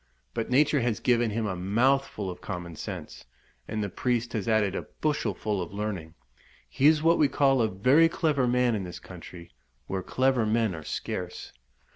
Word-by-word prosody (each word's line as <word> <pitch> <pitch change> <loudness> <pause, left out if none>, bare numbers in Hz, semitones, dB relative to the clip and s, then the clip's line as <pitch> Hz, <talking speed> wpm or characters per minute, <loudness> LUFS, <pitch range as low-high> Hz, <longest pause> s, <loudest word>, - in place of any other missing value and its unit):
But 115 - -3
nature 145 +3 +4
has 120 -3 0
given 120 -2 +2
him 110 +1 -2
a 100 -3 -2
mouthful 105 +2 +1
of 90 - -11
common 90 -3 -6
sense, - - -7 0.4
and 110 -1 -2
the - - -1
priest 120 +3 -1
has 110 -3 -2
added 110 -4 +2
a - - -4
bushelful 110 - -1
of 85 - -5
learning; 100 -6 -4 0.5
he 130 - +2
is 155 0 +4
what 165 +1 +4
we 150 - +5
call 135 -2 +3
a 110 - +3
very 130 +12 +4
clever 150 -6 +1
man 125 0 +2
in 105 -3 -2
this 90 -2 -7
country, 85 -1 -11 0.3
where 95 +6 -3
clever 130 +4 +1
men 110 -1 +1
are 80 -2 -7
scarce. 90 +3 -5
110 Hz, 180 wpm, -27 LUFS, 95-130 Hz, 0.5 s, we